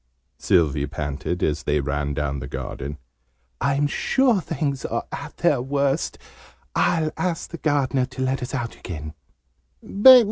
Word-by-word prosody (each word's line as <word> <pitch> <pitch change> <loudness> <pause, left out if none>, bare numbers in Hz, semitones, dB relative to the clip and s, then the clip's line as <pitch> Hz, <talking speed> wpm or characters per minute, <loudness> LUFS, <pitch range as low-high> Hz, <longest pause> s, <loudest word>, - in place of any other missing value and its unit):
Sylvie 75 -5 +2
panted, 75 +4 -3
as 75 - +1
they 75 0 +1
ran 70 +1 -1
down 70 -2 -1
the 65 - -6
garden. 70 +2 -5 0.6
"I'm 140 +2 +2
sure 240 - +2
things 140 -5 -2
are - - -2
at - - -7
their - - +3
worst! 140 +3 0 0.6
I'll 160 -2 +2
ask 175 -3 -2
the 170 - -6
Gardener 140 -4 +1
to 130 0 -4
let 130 0 0
us 125 +2 -4
out 120 -3 -3
again." 75 -3 -7
125 Hz, 140 wpm, -23 LUFS, -, 0.6 s, their